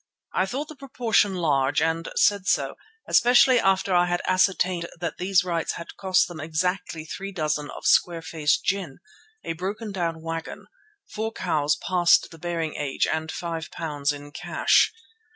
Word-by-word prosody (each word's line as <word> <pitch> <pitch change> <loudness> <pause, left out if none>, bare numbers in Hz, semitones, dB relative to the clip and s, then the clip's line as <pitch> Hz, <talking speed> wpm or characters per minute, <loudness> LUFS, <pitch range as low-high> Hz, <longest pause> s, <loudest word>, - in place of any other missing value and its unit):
I 185 - +1
thought 275 +8 -4
the 310 - -10
proportion 235 -7 +1
large 145 -6 +1
and 165 +1 0
said 200 -2 +2
so, - - +1 0.3
especially 245 +1 +5
after 195 -1 +2
I 175 0 +4
had 175 0 -1
ascertained 185 -2 +1
that 170 -2 -4
these 180 0 +3
rights 170 -2 -2
had 170 - -9
cost 190 -2 +2
them 175 -3 -9
exactly 160 +1 -2
three 195 +5 -6
dozen 150 -4 -2
of - - -9
square 170 -2 +3
face 150 -1 +1
gin, 185 -8 -2 0.5
a - - -3
broken 205 +6 -5
down 165 -4 -3
wagon, 165 0 -5 0.5
four 220 +1 -3
cows 155 -8 0
past 175 -2 +3
the 165 - -13
bearing 165 -2 -3
age 140 -2 0
and 160 0 -2
£5 160 -3 -3
in 145 0 -9
cash. - - +2
175 Hz, 155 wpm, -25 LUFS, 160-190 Hz, 0.5 s, especially